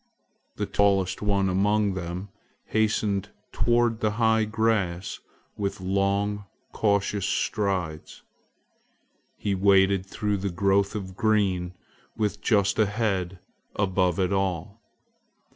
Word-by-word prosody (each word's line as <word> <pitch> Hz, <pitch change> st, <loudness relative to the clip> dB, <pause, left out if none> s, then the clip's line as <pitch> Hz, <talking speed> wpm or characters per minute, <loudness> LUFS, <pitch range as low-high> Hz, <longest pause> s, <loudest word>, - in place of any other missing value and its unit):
The -, -, -2 dB
tallest 95 Hz, -2 st, +1 dB
one 100 Hz, -2 st, +1 dB
among 100 Hz, +2 st, +2 dB
them 90 Hz, +2 st, -5 dB, 0.4 s
hastened 105 Hz, -2 st, 0 dB, 0.2 s
toward 120 Hz, -1 st, +1 dB
the 110 Hz, -2 st, 0 dB
high 110 Hz, -1 st, +3 dB
grass 105 Hz, -4 st, -1 dB, 0.4 s
with 100 Hz, -1 st, -3 dB
long, 100 Hz, +2 st, 0 dB, 0.3 s
cautious 100 Hz, -1 st, 0 dB
strides. 95 Hz, -7 st, -2 dB, 1.1 s
He 100 Hz, -1 st, -1 dB
waded 95 Hz, 0 st, +4 dB
through 105 Hz, +1 st, -1 dB
the 100 Hz, +1 st, -2 dB
growth 100 Hz, +3 st, +1 dB
of 95 Hz, -3 st, -5 dB
green 95 Hz, -4 st, +1 dB, 0.4 s
with 105 Hz, -2 st, -1 dB
just 100 Hz, -2 st, +2 dB
a 110 Hz, -, +4 dB
head 100 Hz, -4 st, -1 dB, 0.4 s
above 95 Hz, -3 st, +1 dB
it 95 Hz, +1 st, +1 dB
all. 95 Hz, +2 st, -2 dB
100 Hz, 110 wpm, -26 LUFS, 95-105 Hz, 1.1 s, waded